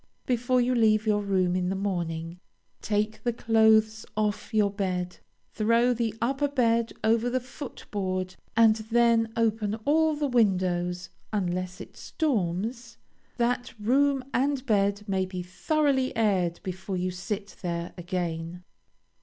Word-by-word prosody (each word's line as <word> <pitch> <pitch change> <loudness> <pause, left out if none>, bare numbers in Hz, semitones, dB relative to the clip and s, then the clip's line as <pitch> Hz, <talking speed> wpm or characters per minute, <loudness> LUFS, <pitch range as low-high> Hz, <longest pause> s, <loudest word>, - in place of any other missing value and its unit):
Before 250 +1 +1
you 245 +1 +2
leave 220 -2 +3
your 210 -1 +2
room 185 -3 +1
in 180 -1 0
the 190 - -1
morning, 170 -3 -3 0.4
take 215 +1 -1
the 240 - +1
clothes 220 -1 +3
off 210 +1 -1
your 210 -3 +2
bed, 180 -3 -2 0.4
throw 230 +3 +3
the 230 -2 -2
upper 270 +4 0
bed 235 -4 +1
over 230 +2 +2
the 255 +1 0
foot 255 +2 -9
board, 185 -2 -2 0.2
and 225 -1 +6
then 225 0 +2
open 220 -2 +1
all 315 +1 +3
the 295 0 -1
windows 180 -7 +1 0.2
(unless 185 -3 -2
it - - -10
storms), 230 - -2 0.4
that 245 +1 -1
room 270 +5 +2
and 275 0 0
bed 200 -3 +1
may 190 -1 +1
be 185 -1 -5
thoroughly 265 - 0
aired 185 -6 +1
before 190 +1 -4
you 180 +1 -1
sit 195 +3 -5
there 170 -1 -3
again. 175 -1 -4
215 Hz, 135 wpm, -27 LUFS, 185-240 Hz, 0.4 s, and